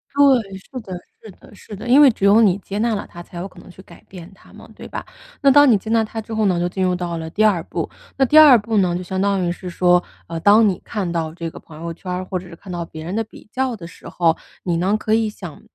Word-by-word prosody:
对， 250 Hz, -9 st, +3 dB
是 255 Hz, +7 st, -9 dB
的 190 Hz, -3 st, -9 dB, 0.3 s
是 215 Hz, -, -11 dB
的 205 Hz, -, -18 dB
是 205 Hz, -, -11 dB
的， 215 Hz, -, -8 dB
因 265 Hz, +4 st, +6 dB
为 285 Hz, -, +8 dB
只 210 Hz, -4 st, -2 dB
有 205 Hz, +3 st, +6 dB
你 195 Hz, -4 st, +4 dB
接 200 Hz, 0 st, -7 dB
纳 230 Hz, 0 st, +1 dB
了 200 Hz, -, -5 dB
它 175 Hz, -, -10 dB
才 175 Hz, -, -12 dB
有 180 Hz, -, -4 dB
可 185 Hz, -2 st, -16 dB
能 -, -, -15 dB
去 185 Hz, +1 st, -14 dB
改 -, -, -17 dB
变 180 Hz, 0 st, -11 dB
它 195 Hz, -, -20 dB
嘛， -, -, -14 dB
对 -, -, -10 dB
吧？ -, -, -7 dB, 0.4 s
那 275 Hz, -, +5 dB
当 290 Hz, +1 st, +7 dB
你 215 Hz, -, +5 dB
接 210 Hz, +3 st, -9 dB
纳 225 Hz, -1 st, +3 dB
它 225 Hz, +1 st, -6 dB
之 225 Hz, +1 st, -7 dB
后 220 Hz, -1 st, +1 dB
呢， 180 Hz, -3 st, +1 dB
就 175 Hz, -, 0 dB
进 190 Hz, +1 st, -3 dB
入 180 Hz, -1 st, +1 dB
到 175 Hz, -1 st, -4 dB
了 160 Hz, 0 st, -6 dB
第 210 Hz, +6 st, 0 dB
2 195 Hz, -6 st, +3 dB
步， -, -, -4 dB, 0.3 s
那 270 Hz, -, +4 dB
第 300 Hz, +5 st, +3 dB
2 290 Hz, -5 st, +9 dB
步 220 Hz, 0 st, -2 dB
呢 180 Hz, -3 st, +2 dB
就 180 Hz, -, -4 dB
相 190 Hz, +2 st, -3 dB
当 195 Hz, -2 st, +1 dB
于 175 Hz, -, 0 dB
是 180 Hz, +1 st, -7 dB
说， 180 Hz, 0 st, +3 dB, 0.2 s
啊 165 Hz, -1 st, -5 dB
当 210 Hz, +5 st, +5 dB
你 190 Hz, -3 st, -1 dB
看 200 Hz, -5 st, -3 dB
到 165 Hz, -2 st, -3 dB
这 170 Hz, -1 st, -5 dB
个 -, -, -12 dB
朋 155 Hz, -1 st, -14 dB
友 170 Hz, 0 st, -5 dB
圈 180 Hz, +2 st, -8 dB
儿 180 Hz, +1 st, -3 dB
或 185 Hz, -1 st, -3 dB
者 185 Hz, -, -12 dB
是 170 Hz, -, -11 dB
看 185 Hz, +2 st, -12 dB
到 175 Hz, -1 st, -3 dB
别 160 Hz, -1 st, -10 dB
人 175 Hz, +5 st, -5 dB
的 225 Hz, -, 0 dB
比 220 Hz, -, -16 dB
较 260 Hz, -2 st, -1 dB
的 180 Hz, -6 st, -10 dB
时 170 Hz, -, -12 dB
候， 165 Hz, -2 st, +1 dB, 0.3 s
你 175 Hz, -2 st, -1 dB
呢， 190 Hz, +5 st, +1 dB
可 215 Hz, -, -1 dB
以 220 Hz, -1 st, +2 dB
想 175 Hz, -7 st, -10 dB
190 Hz, 310 characters per minute, -20 LUFS, 175-220 Hz, 0.4 s, 2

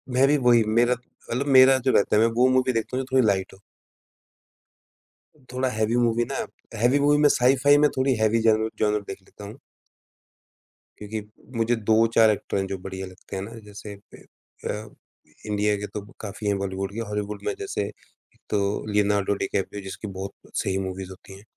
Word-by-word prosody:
मेरी 135 Hz, +3 st, +4 dB
वही, 120 Hz, -3 st, +4 dB
मेरा 120 Hz, +3 st, +3 dB
मतलब 125 Hz, +1 st, -6 dB
मेरा 130 Hz, +1 st, +8 dB
जो 130 Hz, 0 st, +1 dB
रहता 100 Hz, -, +3 dB
है 105 Hz, -, +5 dB
मैं 115 Hz, -, +5 dB
वो 125 Hz, +2 st, +4 dB
मूवी 130 Hz, 0 st, +2 dB
देखता 115 Hz, +2 st, -2 dB
हूँ 130 Hz, -, -1 dB
जो 130 Hz, -, -4 dB
थोड़ी 130 Hz, -3 st, +5 dB
लाइट 95 Hz, -2 st, 0 dB
हो। 95 Hz, -, -16 dB, 1.9 s
थोड़ा 130 Hz, +1 st, 0 dB
हेवी 110 Hz, 0 st, 0 dB
मूवी 120 Hz, 0 st, +2 dB
ना -, -, -3 dB, 0.5 s
हेवी 125 Hz, +4 st, +4 dB
मूवी 145 Hz, +1 st, +4 dB
में 150 Hz, -, +6 dB
साई-फाई 135 Hz, +3 st, +4 dB
में -, -, +4 dB
थोड़ी 130 Hz, 0 st, +2 dB
हेवी 110 Hz, +1 st, +3 dB
ज़रूर 110 Hz, 0 st, +2 dB
ज़रूर 105 Hz, -1 st, +1 dB
देख 95 Hz, 0 st, -7 dB
लेता 100 Hz, +2 st, -13 dB
हूँ। 110 Hz, +6 st, -10 dB, 1.4 s
क्योंकि 105 Hz, +1 st, -5 dB, 0.4 s
मुझे 115 Hz, +1 st, +2 dB
2-4 110 Hz, 0 st, +4 dB
एक्टर 105 Hz, -1 st, -1 dB
हैं 95 Hz, 0 st, -1 dB
जो 95 Hz, -, -4 dB
बढ़िया 95 Hz, 0 st, -7 dB
लगते 95 Hz, +1 st, -11 dB
हैं 95 Hz, -, -3 dB
ना, 105 Hz, -, -8 dB
जैसे 105 Hz, 0 st, -9 dB, 0.2 s
ए -, -, -17 dB, 0.4 s
अ, 105 Hz, +1 st, -4 dB, 0.6 s
इंडिया 105 Hz, 0 st, +1 dB
के 105 Hz, +1 st, -5 dB
तो 105 Hz, -, -6 dB, 0.2 s
काफ़ी 105 Hz, 0 st, -6 dB
है 100 Hz, -, +2 dB
बॉलीवुड 95 Hz, 0 st, -4 dB
के, 115 Hz, -, -5 dB
हॉलीवुड 105 Hz, 0 st, -4 dB
में 105 Hz, -, 0 dB
जैसे 100 Hz, -, -3 dB
एक 105 Hz, -, -19 dB
तो 105 Hz, -, +1 dB, 0.3 s
लियोनार्डो 100 Hz, -1 st, +2 dB
डिकैप्रियो 100 Hz, +1 st, -3 dB
जिसकी 95 Hz, +2 st, -7 dB
बहुत 95 Hz, +1 st, -5 dB, 0.3 s
सही 95 Hz, -, -1 dB
मूवीज 95 Hz, 0 st, -6 dB
होती 95 Hz, +1 st, -12 dB
है। 100 Hz, -, -16 dB
110 Hz, 185 wpm, -24 LUFS, 100-125 Hz, 1.9 s, मेरा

